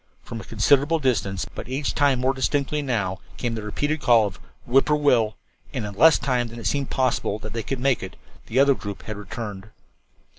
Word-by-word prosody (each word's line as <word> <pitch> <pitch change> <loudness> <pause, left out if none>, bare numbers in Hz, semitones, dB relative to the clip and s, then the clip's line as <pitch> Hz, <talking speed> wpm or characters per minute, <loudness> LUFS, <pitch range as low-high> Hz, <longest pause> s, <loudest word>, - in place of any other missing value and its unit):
From 115 -1 -7
a - - -10
considerable 140 - +3
distance, 100 - 0
but - - -7
each 135 +2 -1
time 140 -3 +3
more 130 +1 +2
distinctly, 140 +2 0
now 100 -9 -1 0.2
came 120 -2 -2
the 110 - -4
repeated 145 +8 -2
call 115 -4 +5
of 95 -2 -6 0.3
"Whip 135 +3 +4
poor 150 - +3
will," 120 -8 +2 0.4
and - - -3
in 105 - -6
less 155 +10 +6
time 125 -3 0
than 115 +1 -10
it 115 - -8
seemed 140 +7 0
possible 130 -5 0
that 110 -1 -8
they 115 - -2
could 135 +4 -4
make 135 -1 +2
it, 95 -1 -7 0.3
the 115 - -3
other 140 +1 +6
group 100 -6 -7
had 110 - -5
returned. 105 0 -7
120 Hz, 210 wpm, -24 LUFS, 105-140 Hz, 0.4 s, less